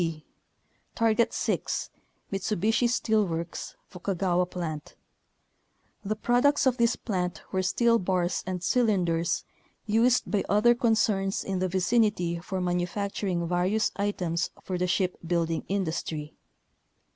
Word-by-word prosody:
b. 165 -2 -3 0.7
Target 230 0 +2
6, - - -2 0.4
Mitsubishi 215 +4 +1
Steel 220 -2 +2
Works, 165 0 -5
Fukaga 180 -1 -2
wa 180 +1 +3
Plant. 165 -4 -6 1.1
The 215 +1 -1
products 245 +7 +2
of 255 -1 +3
this 235 -1 +3
plant 180 -6 -3
were 190 - +1
steel 230 +5 +3
bars 180 -1 0
and 180 -1 -3
cylinders 180 -8 +1 0.4
used 230 +3 +3
by 205 - 0
other 210 +4 +5
concerns 215 -4 +1
in 190 -2 -2
the 185 - +1
vicinity 185 -2 +1
for 185 +2 -4
manufacturing 180 0 -1
various 180 +5 +1
items 180 -5 -1
for 185 -2 -3
the 180 - +1
ship 185 0 0
building 165 -1 -1
industry. 160 -5 -3
190 Hz, 120 wpm, -27 LUFS, 175-215 Hz, 1.1 s, other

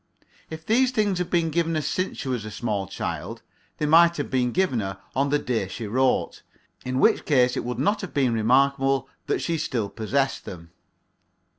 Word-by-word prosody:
If 160 0 -8
these 250 +4 +3
things 210 -7 0
were 180 - 0
given 165 -1 0
her 155 - 0
since 185 +5 -2
she - - -5
was 125 -4 -2
a 110 - -6
small 105 -3 -3
child, - - -5 0.3
they 150 - -1
might 170 +3 +5
have 145 - -4
been 125 -2 +1
given 180 -8 +1
her 95 -2 -4 0.2
on 140 +1 +1
the 145 - +3
day 120 -8 -2
she 110 +4 -6
wrote 130 +5 0 0.4
in 130 +1 -2
which - - +4
case 125 -4 +3
it - - -2
would 125 +1 -4
not 205 +2 +1
have 195 - -6
been 130 -4 +1
remarkable 135 +3 +2 0.2
that - - -1
she 165 -2 -1
still 115 -9 -2
possessed 135 +6 -1
them. 85 -2 -10
135 Hz, 190 wpm, -24 LUFS, 120-165 Hz, 0.4 s, might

